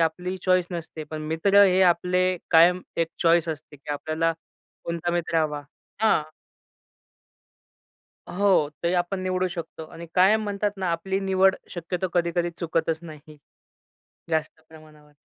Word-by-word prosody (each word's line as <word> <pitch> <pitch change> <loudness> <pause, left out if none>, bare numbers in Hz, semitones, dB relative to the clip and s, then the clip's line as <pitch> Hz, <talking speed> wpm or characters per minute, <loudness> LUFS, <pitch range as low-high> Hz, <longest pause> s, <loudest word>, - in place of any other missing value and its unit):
आपली 180 +3 -1
चॉईस 185 -1 +3
नसते. 165 -2 -6
पण 155 +1 -7
मित्र 195 +6 +4
हे 185 -1 +3
आपले 180 +1 +2
कायम 175 +2 +6 0.2
एक 165 -1 +1
चॉईस 170 0 +4
असते 155 -1 -6
की 145 +1 -10
आपल्याला 155 +3 -1 0.5
कोणता 170 0 -2
मित्र 170 -1 -1
हवा 150 -1 -3 0.4
हां. 220 -8 +4 2.1
हो, 190 -6 +3
ते 170 +1 +1
आपण 180 +2 -1
निवडू 185 0 0
शकतो 170 -2 -7
आणि 170 +1 -9
कायम 195 +4 +4
म्हणतात 205 0 -1
ना 190 -2 -1
आपली 190 +3 -2
निवड 190 0 +3 0.2
शक्यतो 180 +1 -3
कधी-कधी 175 0 +1
चुकतच 165 -1 -1
नाही. 155 -2 -12 0.9
जास्त 160 0 -2
प्रमाणावर. 155 -2 -17
170 Hz, 135 wpm, -25 LUFS, 160-185 Hz, 2.1 s, कायम